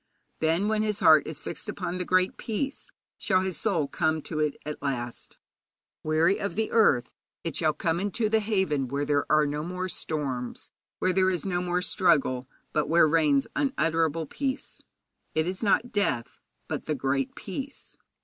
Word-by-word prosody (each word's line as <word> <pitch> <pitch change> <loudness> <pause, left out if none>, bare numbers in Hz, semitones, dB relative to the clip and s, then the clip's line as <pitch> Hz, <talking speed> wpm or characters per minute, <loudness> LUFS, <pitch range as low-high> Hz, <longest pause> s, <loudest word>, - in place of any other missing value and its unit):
Then, 165 +5 +2
when 215 0 +1
his 210 -1 0
heart 155 -1 +6
is 155 - -4
fixed - - -6
upon 180 +1 -3
the 180 - -2
Great 185 +1 +2
Peace, 270 +6 -3 0.3
shall 185 - +2
his 190 -2 -3
soul 180 -10 +1
come 160 +1 0
to 155 - -4
it 150 -2 0
at 150 0 -5
last. 120 -4 -4 0.6
Weary 160 +5 +2
of 200 - -3
the 220 +1 -1
earth, 130 - +3 0.3
it 165 -4 -3
shall 155 -2 +2
come 165 0 0
into 205 +3 0
the 220 +1 +3
haven 190 - 0
where 140 +3 -2
there 145 -1 0
are 155 0 +5
no 150 +1 -2
more 180 +2 -3
storms, 135 -8 -3 0.3
where 185 - +1
there 190 0 +3
is 180 -2 -2
no 180 -2 0
more 180 0 0
struggle, 140 -10 +2 0.2
but 150 -1 +1
where 165 0 +6
reigns 150 -3 +3
unutterable 165 - +1
peace. 270 - -3 0.5
It 155 0 +2
is 185 +1 -3
not 225 +3 +2
death, 140 - -1 0.3
but - - -4
the 155 - -1
Great 135 0 -1
Peace. 270 +8 -7
165 Hz, 175 wpm, -27 LUFS, 150-195 Hz, 0.6 s, heart